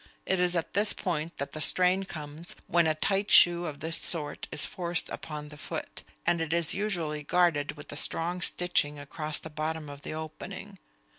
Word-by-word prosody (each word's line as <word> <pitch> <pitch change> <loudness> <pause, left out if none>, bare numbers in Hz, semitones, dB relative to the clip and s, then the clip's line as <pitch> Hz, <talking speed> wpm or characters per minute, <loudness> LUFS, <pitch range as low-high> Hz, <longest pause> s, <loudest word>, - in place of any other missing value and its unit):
It 190 - +1
is 180 0 +2
at 165 - -2
this 205 +1 +3
point 165 -2 -3
that 140 - -4
the 155 - -5
strain 185 +4 +5
comes 155 -1 -5
when 170 -1 +3
a 155 - +1
tight 195 +5 0
shoe 175 0 +7
of 150 -1 -7
this 165 +2 -2
sort 155 -4 -1
is 150 - +3
forced 175 -2 -1
upon 150 -1 -6
the 150 0 -13
foot, - - -6 0.2
and 170 - +2
it 160 0 -2
is 170 -2 +2
usually 170 -7 -2
guarded 165 -2 +2
with 145 -1 -12
a - - -6
strong 175 +4 +1
stitching 170 -6 +1
across 150 +2 -3
the 160 - -4
bottom 155 0 -3
of 140 0 -11
the 155 - -6
opening. 155 0 -8
160 Hz, 195 wpm, -29 LUFS, 150-175 Hz, 0.2 s, shoe